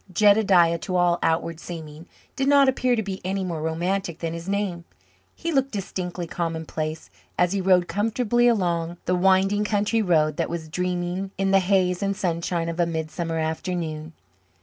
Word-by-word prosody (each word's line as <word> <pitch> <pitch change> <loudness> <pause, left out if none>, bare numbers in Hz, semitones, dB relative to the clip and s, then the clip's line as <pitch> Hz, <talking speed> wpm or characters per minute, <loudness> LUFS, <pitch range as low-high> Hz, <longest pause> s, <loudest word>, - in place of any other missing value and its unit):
Jedediah, 190 -4 +4
to 185 - -4
all 175 -1 +3
outward 165 0 0
seeming, 160 -1 -9 0.3
did 270 0 0
not 280 -1 +6
appear 255 -1 +2
to 220 - -1
be 190 -1 -5
any 190 +1 -2
more 170 -4 -3
romantic 170 +2 -2
than 165 -1 -4
his 170 +2 -6
name. 195 -4 -2 0.5
He 335 - -3
looked 275 -3 +1
distinctly 185 -5 -4
commonplace 160 -2 -4 0.3
as 180 0 +3
he 200 - 0
rode 180 -2 +3
comfortably 230 +3 +1
along 175 -6 0
the 180 - +1
winding 190 +3 +3
country 210 +2 +1
road 155 -6 +2
that - - -1
was 165 -2 -5
dreaming 180 +2 -2
in 195 0 +1
the 195 - +6
haze 185 -1 +1
and 200 -1 -1
sunshine 170 -2 -1
of 170 +1 -4
a 170 - +3
midsummer 165 0 -3
afternoon. 160 -1 -3
180 Hz, 170 wpm, -24 LUFS, 165-200 Hz, 0.5 s, not